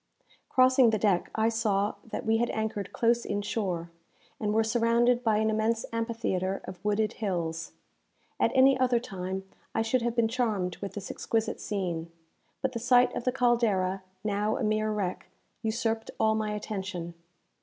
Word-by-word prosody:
Crossing 255 -1 +5
the 220 - +2
deck, 195 -4 +1
I 220 0 +2
saw 215 -3 +1
that 225 - -5
we 225 0 +3
had 240 +1 +1
anchored 215 -2 -3
close 235 0 +2
in 205 0 -2
shore, 180 -6 -2 0.5
and 210 -1 0
were 220 +1 +3
surrounded 235 +2 +2
by 220 -3 +3
an 220 0 +2
immense 220 +1 0
amphitheatre 225 -5 -1
of 180 - -9
wooded 210 +1 +1
hills. 170 -5 -2 0.7
At - - +3
any 265 +1 +6
other 250 -2 +3
time 190 -3 -5 0.3
I 225 - +2
should 235 +3 +1
have 235 0 -1
been 235 -2 +3
charmed 220 -7 -1
with 200 - -6
this 195 -2 -5
exquisite 225 0 -2
scene; 175 -5 -3 0.5
but 265 - +1
the 235 - -4
sight 245 +1 +4
of - - -4
the 255 - +3
"Caldera," 225 -7 +2 0.2
now 210 +1 0
a - - -2
mere 215 0 +1
wreck, 195 -4 -3 0.3
usurped 225 0 -1
all 220 0 +4
my 215 -1 -1
attention. 190 -5 -4
220 Hz, 165 wpm, -29 LUFS, 195-235 Hz, 0.7 s, any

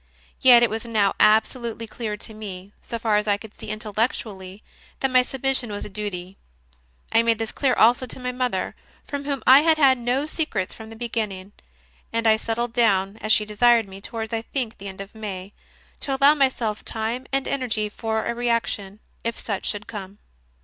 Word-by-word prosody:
Yet 245 -2 +8
it 235 - +3
was 220 +1 -3
now 215 -4 +2
absolutely 230 +2 +2
clear 220 -1 -5
to 220 - -7
me, 200 -2 -8
so 235 - -5
far 220 -2 +2
as 210 0 -1
I 205 -1 +3
could 215 0 -12
see - - -10
intellectually, 215 -2 -3 0.4
that 270 - 0
my 255 0 +6
submission 265 -1 -1
was 205 - -5
a - - -7
duty. 195 -2 -5 0.7
I 225 - +5
made 230 -1 +2
this 225 0 -3
clear 275 -3 +1
also 245 +3 +4
to - - -4
my 250 0 -3
mother, 250 -7 -2 0.3
from 285 -1 -5
whom 280 -2 -2
I 260 +2 +9
had 320 +1 +3
had 265 -4 +5
no 250 +4 0
secrets 300 - -2
from 220 -1 -10
the 225 - -10
beginning; 215 -5 -3 0.6
and 230 0 -1
I 220 -1 +6
settled 230 +1 -2
down, 200 -4 +2
as 215 -1 -2
she 215 - +5
desired 230 +1 +4
me, 195 0 -10
towards, 225 +1 -5
I 225 - 0
think, 235 -1 -4
the 200 - -7
end 190 0 -7
of 195 - -9
May, 200 -3 -6 0.5
to 270 -1 -1
allow 280 +2 +7
myself 255 -7 0
time 225 +3 -3
and 270 0 0
energy 225 -6 -1
for 220 +1 -2
a 235 - -1
reaction, 230 -4 -1 0.2
if 230 0 -2
such 200 -4 -4
should 210 0 -3
come. 200 -2 -8
225 Hz, 195 wpm, -24 LUFS, 210-245 Hz, 0.7 s, I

